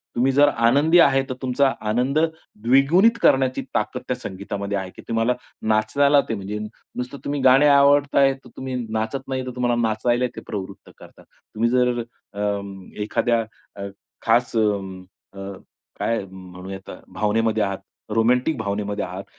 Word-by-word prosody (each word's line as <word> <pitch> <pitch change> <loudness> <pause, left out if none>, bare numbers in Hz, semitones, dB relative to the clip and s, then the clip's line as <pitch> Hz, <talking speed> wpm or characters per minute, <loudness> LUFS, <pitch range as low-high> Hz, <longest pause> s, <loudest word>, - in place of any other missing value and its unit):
तुम्ही 130 +3 +2
जर 145 +2 +5
आनंदी 145 +8 +4
आहे 135 -4 +5
तर - - -1
तुमचा 130 +1 +2 0.2
आनंद 125 +6 +1 0.5
द्विगुणित 150 - +4
करण्याची 130 -1 +3
ताकद - - -1
त्या - - 0
संगीतामध्ये 100 +1 -5
आहे, 95 -1 -4
की - - -11
तुम्हाला 115 +2 +1 0.4
नाचायला 125 +7 +3
ते 115 - 0
म्हणजे 100 +1 -5
नुसतं 125 +4 -8
तुम्ही 145 0 -2
गाणे 130 +3 +6
आवडत 140 0 +4
आहे 135 -1 +5
तर 135 -2 -15
तुम्ही 130 -1 -4
नाचत 110 +5 -3
नाही 130 -1 -3
तर 130 - -5
तुम्हाला 120 -1 +1
नाचायला 120 +3 +1
ते - - -7
प्रवृत्त 100 -2 -7
करतं. - - -16 0.3
तुम्ही 115 +2 +2
जर 125 -1 +2 0.3
अ, 100 - -5 0.6
एखाद्या 115 +2 +1 0.4
अ, 100 - -4 0.4
खास 120 0 +2
अ, 100 -2 -3 0.5
काय 115 -2 0
म्हणूया 95 +1 -9
भावनेमध्ये 110 +1 0
आहात, 100 -1 -2 0.4
रोमॅन्टिक 125 +6 +2
भावनेमध्ये 105 -1 -2
आहात 95 +2 -7
120 Hz, 145 wpm, -22 LUFS, 105-135 Hz, 0.6 s, गाणे